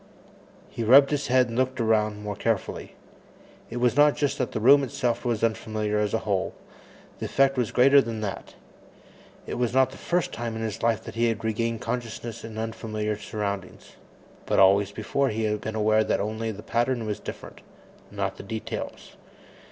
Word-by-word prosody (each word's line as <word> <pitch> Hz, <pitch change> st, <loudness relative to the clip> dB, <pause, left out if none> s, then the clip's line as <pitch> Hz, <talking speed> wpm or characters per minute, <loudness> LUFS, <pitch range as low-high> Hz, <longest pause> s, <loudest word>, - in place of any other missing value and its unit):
He 115 Hz, -, -5 dB
rubbed 135 Hz, +5 st, +7 dB
his 145 Hz, -1 st, -1 dB
head 125 Hz, -1 st, +3 dB
and 115 Hz, -, -5 dB
looked 130 Hz, +1 st, 0 dB
around 105 Hz, -2 st, +1 dB
more 105 Hz, -1 st, -4 dB
carefully. 110 Hz, -3 st, -2 dB, 0.7 s
It 120 Hz, -, -5 dB
was 125 Hz, 0 st, +2 dB
not 145 Hz, 0 st, +5 dB
just 145 Hz, -2 st, -1 dB
that 130 Hz, -, -1 dB
the -, -, -2 dB
room 140 Hz, +5 st, +6 dB
itself 120 Hz, -1 st, -1 dB
was 120 Hz, -3 st, -1 dB
unfamiliar 110 Hz, -2 st, -1 dB
as 105 Hz, +1 st, 0 dB
a 115 Hz, -, -3 dB
whole; 100 Hz, -3 st, -1 dB, 0.6 s
the -, -, -3 dB
effect 135 Hz, 0 st, +3 dB
was 125 Hz, -4 st, 0 dB
greater 140 Hz, +3 st, +6 dB
than 115 Hz, -3 st, -5 dB
that. 100 Hz, -2 st, -5 dB, 0.9 s
It -, -, -5 dB
was 125 Hz, 0 st, 0 dB
not 130 Hz, 0 st, +4 dB
the -, -, -12 dB
first 175 Hz, 0 st, 0 dB
time 115 Hz, -1 st, -4 dB
in 110 Hz, -, -4 dB
his 110 Hz, -2 st, -4 dB
life 115 Hz, -2 st, +1 dB
he 115 Hz, +1 st, +1 dB
had 115 Hz, -3 st, -2 dB
regained 115 Hz, +1 st, -1 dB
consciousness 120 Hz, -2 st, -5 dB
in 110 Hz, -1 st, -8 dB
unfamiliar 110 Hz, -1 st, -3 dB
surroundings, 100 Hz, -3 st, -5 dB, 0.6 s
but -, -, +1 dB
always 100 Hz, +1 st, +5 dB
before 130 Hz, +6 st, -1 dB
he 110 Hz, +1 st, -2 dB
had 105 Hz, -1 st, -1 dB
been 110 Hz, -, -4 dB
aware 110 Hz, 0 st, +3 dB
that -, -, 0 dB
only 110 Hz, +2 st, -2 dB
the 105 Hz, 0 st, -9 dB
pattern 120 Hz, +1 st, 0 dB
was 105 Hz, -2 st, -3 dB
different, -, -, -9 dB, 0.5 s
not -, -, -3 dB
the -, -, -7 dB
details. 110 Hz, +2 st, -6 dB
115 Hz, 185 wpm, -26 LUFS, 105-125 Hz, 0.9 s, rubbed